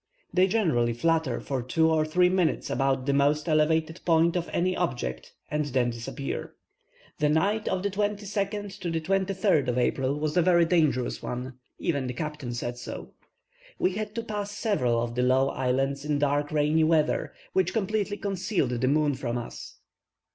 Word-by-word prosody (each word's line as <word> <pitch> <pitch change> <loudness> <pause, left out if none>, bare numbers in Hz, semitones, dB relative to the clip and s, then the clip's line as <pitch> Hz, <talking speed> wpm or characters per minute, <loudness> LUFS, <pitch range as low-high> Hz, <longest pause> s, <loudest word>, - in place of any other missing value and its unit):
They 185 +1 +4
generally 160 - +1
flutter 160 0 +1
for 135 -2 -3
two 160 +6 +2
or 155 -1 +2
three 180 +3 +3
minutes 180 -3 +1
about 135 0 +1
the 140 - +1
most 145 +2 +2
elevated 160 +1 +1
point 165 0 +3
of 175 -1 -2
any 185 +1 +1
object, 125 - -3 0.2
and 150 0 0
then 125 -3 +1
disappear. 120 +4 -5 0.6
The 150 - +3
night 200 +8 +1
of 190 0 -1
the 200 - 0
22nd 205 0 -2
to 180 - -3
the 165 -1 0
23rd 190 - +1
of 125 0 0
April 135 +3 0
was 150 0 -1
a 180 - +5
very 170 -1 +4
dangerous 155 -7 +1
one; 125 +1 -5 0.2
even 140 -6 -1
the 125 - -3
captain 150 -4 -4
said 120 0 -4
so. 120 - -7 0.7
We 185 - +2
had 210 +2 -5
to 230 - -2
pass 205 -2 -4
several 125 - +1
of 120 0 -4
the 125 - 0
low 130 +2 +3
islands 135 +2 -1
in 150 -1 0
dark 145 0 0
rainy 155 +1 +2
weather, 155 -1 +2 0.2
which 190 -1 +2
completely 210 0 -1
concealed 190 - -1
the 125 +1 0
moon 145 +1 +2
from 125 -2 -3
us. 120 - -8
155 Hz, 175 wpm, -27 LUFS, 130-185 Hz, 0.7 s, a